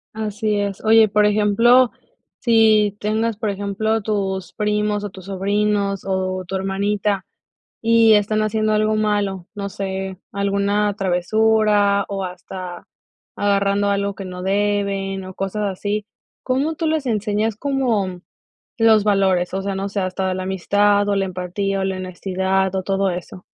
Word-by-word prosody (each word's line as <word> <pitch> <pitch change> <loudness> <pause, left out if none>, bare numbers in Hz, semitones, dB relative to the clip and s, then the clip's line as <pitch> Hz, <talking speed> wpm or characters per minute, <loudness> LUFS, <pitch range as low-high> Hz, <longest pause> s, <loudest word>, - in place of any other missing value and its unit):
Así 215 -1 -1
es. 200 0 -3
Oye, 220 0 +6
por 210 +1 +3
ejemplo, 215 +4 +4 0.5
si 220 -3 +4
tengas, 220 +2 0
por 215 0 -2
ejemplo, 205 +2 -1
tus 190 -4 -2
primos, 210 -1 0
o 205 - -3
tus 190 -2 -12
sobrinos 200 0 0
o 185 -1 -1
tu 190 +2 -5
hermanita, 195 +1 -1 0.6
y 225 -1 +5
están 215 +1 +2
haciendo 215 0 0
algo 215 0 +2
malo, 205 -4 -1
no 200 -1 -4
sé, 190 -1 -4
alguna 200 +1 +1
travesura, 205 +1 +2
o 195 -1 -3
hasta 180 0 -8 0.5
agarrando 200 0 +1
algo 200 0 -1
que 195 - -7
no 180 0 -7
deben 195 -1 -1
o 185 - -9
cosas 195 +3 -3
así, 205 +2 -2 0.4
¿cómo 275 +5 0
tú 320 +1 -2
les 310 -3 -1
enseñas, 215 -1 0
como 225 -9 -1 0.6
los 220 -2 +5
valores? 190 -3 +2
O 195 - -2
sea, 195 -1 -3
no 195 +1 -2
sé, 200 0 -2
hasta 185 0 -1
la 185 - -3
amistad, 205 +2 +2
o 205 - +2
la 195 -1 +1
empatía, 185 +2 -3
o - - 0
la 190 -1 -2
honestidad 190 +1 -1
o 190 - -1
todo 195 0 0
eso. 180 +1 -7
200 Hz, 150 wpm, -20 LUFS, 190-215 Hz, 0.6 s, Oye